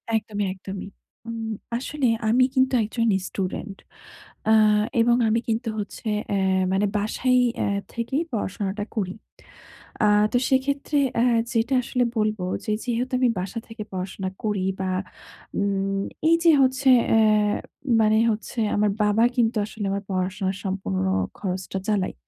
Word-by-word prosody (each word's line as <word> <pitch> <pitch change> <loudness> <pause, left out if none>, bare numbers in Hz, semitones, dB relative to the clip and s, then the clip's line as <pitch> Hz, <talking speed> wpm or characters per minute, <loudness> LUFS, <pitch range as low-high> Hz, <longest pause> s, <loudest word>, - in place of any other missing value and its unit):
একদমই, 210 -2 -1
একদমই। 190 +1 -7 0.4
উম 225 -1 -4 0.3
আসলে 275 0 -1 0.2
আমি 250 +3 +4
কিন্তু 260 0 +3
একজন 230 +2 -1 0.2
স্টুডেন্ট 195 +1 -4 0.7
আ - - +7 0.5
এবং 240 +1 +4
আমি 225 +1 +2
কিন্তু 225 +1 -1
হচ্ছে 210 +2 -6 0.2
অ্যা 190 -2 +1
মানে 200 +2 +2
বাসায় 250 +5 +1 0.2
এ - - 0 0.3
থেকেই 240 +6 -1
পড়াশোনাটা 205 -1 -3
করি। 190 -3 -1 0.9
আ - - +5 0.3
তো - - +4
সেক্ষেত্রে 280 +2 +1 0.2
অ্যা 235 +2 +3 0.3
যেটা 235 +4 +1
আসলে 250 +1 0
বলবো 215 -3 0 0.2
যে, 215 - -1
যেহেতু 245 +2 -2
আমি 250 -2 +3
বাসা 190 +5 -4
থেকে 225 -2 -7
পড়াশোনা 190 +1 -4
করি 205 -3 0 0.2
বা, 185 -1 -1 0.7
উম 195 -1 0 0.3
এইযে 335 0 +5
হচ্ছে 260 +1 +3 0.2
অ্যা 225 - +5 0.8
মানে 215 0 +4
হচ্ছে 220 +2 -5 0.2
আমার 210 -1 +2
বাবা 210 +2 +3
কিন্তু 230 -1 +2
আসলে 215 -1 -6
আমার 200 0 -2
পড়াশোনার 185 +1 -1
সম্পূর্ণ 140 - -2 0.3
খরচটা 190 0 -3
চালায়। 205 -3 0
215 Hz, 135 wpm, -24 LUFS, 195-240 Hz, 0.9 s, আ